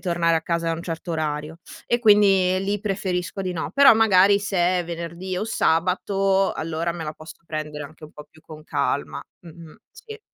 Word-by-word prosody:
tornare 170 -2 +1
a 160 - -2
casa 170 0 -1
a - - 0
un 165 - -7
certo 165 0 -5
orario; 155 0 -3 0.3
e 240 - +1
quindi 195 -4 +4
lì 205 +1 -1
preferisco 195 -2 -3
di 185 -1 -3
no. 160 -4 -4
Però 275 -3 +7
magari 200 -2 +5
se 200 -1 -4 0.2
è - - -5
venerdì 170 +2 -6
o 210 - -2
sabato, 195 +1 +1
allora 165 +1 -3
me 170 -1 -6
la 150 - -5
posso 155 +1 -12
prendere 150 -2 -5
anche 155 +2 -13
un 155 - -14
po' 150 0 -12
più 160 +1 -22
con 155 -1 -12
calma, 145 -2 -2 0.2
mh-mh, 165 -2 -14
sì. 440 -2 -12
170 Hz, 190 wpm, -23 LUFS, 160-195 Hz, 0.3 s, Però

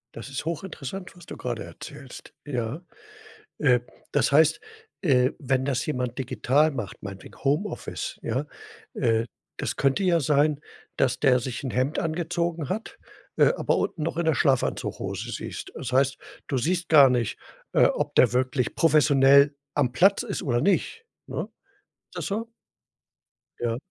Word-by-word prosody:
Das 115 +4 -8
ist 135 +2 -5
hochinteressant, 170 +1 -5
was 175 - -14
du - - -8
gerade 120 -5 -4
erzählst, 130 - -11
ja? 130 +3 -3 0.8
Äh, 125 -5 +4 0.3
das 140 -2 +2
heißt, 155 +2 +5 0.4
äh, 130 -7 +3
wenn 130 -2 0
das 135 -3 0
jemand 125 -4 -2
digital 135 +4 +2
macht, 120 -9 -6
meinetwegen 100 -2 -9
Homeoffice, 150 +9 -2
ja, 130 +6 -2 0.5
äh, 115 0 +1 0.3
das - - -3
könnte 135 +7 +2
ja 175 -2 +3
sein, 145 +1 +2 0.4
dass 125 -1 +1
der 125 -2 +5
sich 125 -1 -4
'n 130 - -2
Hemd 130 +5 0
angezogen 170 -1 -2
hat, 215 +4 -4 0.4
äh, - - +5
aber - - +1
unten 160 - -2
noch 165 - -2
in 170 - 0
der 160 - +3
Schlafanzughose 135 -4 -1
siehst. - - -6
Das 130 - -6
heißt, 130 0 +3 0.3
du 135 - -1
siehst 170 +6 0
gar 140 -4 +8
nicht, 120 -4 -1 0.4
äh, - - +6
ob - - 0
der - - +5
wirklich 130 0 0
professionell 140 -2 +5 0.2
am 130 -4 +1
Platz 195 - +4
ist 210 -5 -4
oder 120 -7 0
nicht, 200 - 0 0.2
ne? - - -3 0.7
Ist - - -16
das - - -3
so? 225 +3 -3 1.1
Ja. 115 -1 -1
140 Hz, 155 wpm, -26 LUFS, 125-160 Hz, 1.1 s, gar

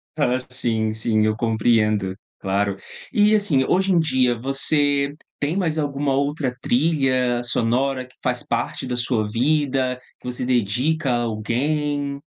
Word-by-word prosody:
Ah, 130 -5 +1
sim, 110 -4 0
sim, 110 -1 +1
eu 110 0 +1
compreendo, 110 -3 +1 0.2
claro. 100 0 0 0.3
E 210 -2 +4
assim, 175 -11 +2
hoje 190 +2 +2
em 175 - +4
dia, 130 -6 +2
você 140 +2 +1 0.2
tem 150 +6 -1
mais 165 -5 0
alguma 140 -1 -1
outra 140 -2 -1
trilha 130 -4 +1
sonora 125 +3 0
que 130 - -22
faz 125 -1 -1
parte 120 +2 -2
da 125 -1 -3
sua 120 -3 0
vida, 130 +1 +1 0.2
que - - -19
você 125 0 -3
dedica 125 +6 +1
a 120 -1 +1
alguém? 140 +6 -1
130 Hz, 140 wpm, -22 LUFS, 115-145 Hz, 0.3 s, E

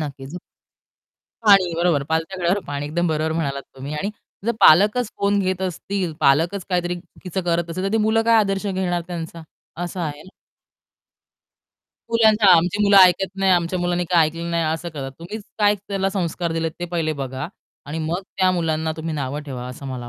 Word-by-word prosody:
नक्कीच. 140 +2 -6 1.1
पाणी, 195 -4 +6
बरोबर. 170 -4 +1
"पालथ्या 160 +4 -1
घड्यावर 175 +3 +1
पाणी", 145 0 -4
एकदम 170 +4 -1
बरोबर 155 0 0
म्हणालात 140 -4 -2
तुम्ही. 140 +3 -6
आणि 195 +7 -2 0.4
जर - - +3
पालकच 210 +8 +6
फोन 200 0 +1
घेत 185 -1 -1
असतील, 185 0 -3
पालकच 165 +7 +2
काहीतरी 175 -1 -1
चुकीचं 180 +1 -6
करत 170 -1 0
असतील, 185 +3 -3
तर 195 - -1
ती 225 - +3
मुलं 225 +1 +3
काय 230 0 +5
आदर्श 195 -1 0
घेणार 185 -2 -1
त्यांचा? 165 -1 -6 0.4
असं 175 +1 -5
आहे 150 -3 -4
ना. 190 - -15 1.8
मुलांना, 220 -2 +4
आमची 180 +5 +1
मुलं 200 -1 +5
ऐकत 190 +1 +5
नाही, 195 0 +2
आमच्या 175 +1 +1
मुलांनी 175 0 0
काय 170 -3 +5
ऐकलं 165 +2 -5
नाही 170 -1 0
असं 170 +1 -6
करतात. 140 -4 -6
तुम्हीच 195 +6 -7 0.2
काय 205 0 +4
त्याला 195 -1 0
संस्कार 175 -3 -2
दिलेत 165 0 -1
ते - - -1
पहिले 165 -2 -1
बघा 130 +3 -5 0.4
आणि 150 +3 -4
मग 165 +4 -2
त्या 185 -1 +3
मुलांना 160 -2 -1
तुम्ही 160 0 -4
नावं 140 0 -3
ठेवा, 130 -4 -6
असं 125 +2 -9
मला 125 -2 -6
175 Hz, 180 wpm, -22 LUFS, 155-190 Hz, 1.8 s, पाणी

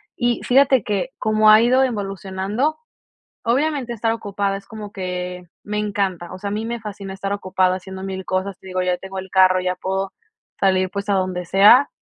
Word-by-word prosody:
Y 240 -2 0
fíjate 265 -2 +4
que 210 +5 -1
como 215 0 +3
ha 215 +1 +8
ido 255 +3 +4
evolucionando, 200 +4 -2 0.7
obviamente 260 0 0
estar 225 0 0
ocupada 200 -3 -2
es 195 - -14
como 210 -2 -8
que 180 -2 -5 0.2
me 210 0 -3
encanta. 195 -4 -2
O - - -7
sea, 200 +1 -4
a - - -5
mí 215 +2 -3
me 235 0 -3
fascina 205 -2 -7
estar 195 +1 -3
ocupada 185 -2 +1
haciendo 190 0 -9
mil 190 -1 -5
cosas, 185 0 -2
te - - -14
digo, 185 0 -1
ya 180 -1 0
tengo 190 0 -8
el 190 0 -6
carro, 185 -1 +5
ya 180 0 0
puedo 190 +1 -3 0.5
salir, 185 -1 +2
pues, 200 +1 -4
a - - +3
donde 185 -2 -1
sea, 205 +9 +6
195 Hz, 195 wpm, -21 LUFS, 185-215 Hz, 0.7 s, ha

